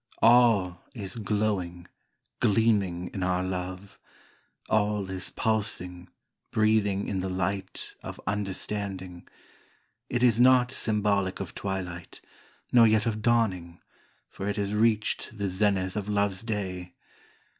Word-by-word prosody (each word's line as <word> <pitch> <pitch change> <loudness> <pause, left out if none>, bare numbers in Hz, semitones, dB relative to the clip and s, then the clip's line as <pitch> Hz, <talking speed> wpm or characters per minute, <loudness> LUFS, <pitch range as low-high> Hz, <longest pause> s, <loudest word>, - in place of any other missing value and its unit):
All 110 -7 +5
is 100 -5 -5
glowing, 100 -5 -2 0.5
gleaming 100 -5 +2
in 95 - -4
our 90 0 +1
love, 95 +1 -5 0.7
All 105 -2 +1
is 95 0 -1
pulsing, 90 -5 -2 0.4
breathing 105 -2 +2
in 95 - -1
the 95 +1 -2
light 95 +1 -3
Of - - -8
understanding 95 -2 -4 0.4
— 115 +5 -39
it 120 0 0
is 120 -2 +4
not 125 0 +5
symbolic 105 -5 0
of 95 -4 -5
twilight, 90 -3 -5 0.5
Nor 120 -2 +7
yet 110 0 +3
of 110 -2 -1
dawning, 95 -8 +1 0.5
for 100 - -5
it 100 - -1
has 100 0 -2
reached 110 0 +1
the 100 -1 -1
zenith 95 -1 0
of 105 -1 -3
love's 100 -2 0
day. 95 -5 -4
100 Hz, 125 wpm, -27 LUFS, 95-110 Hz, 0.7 s, Nor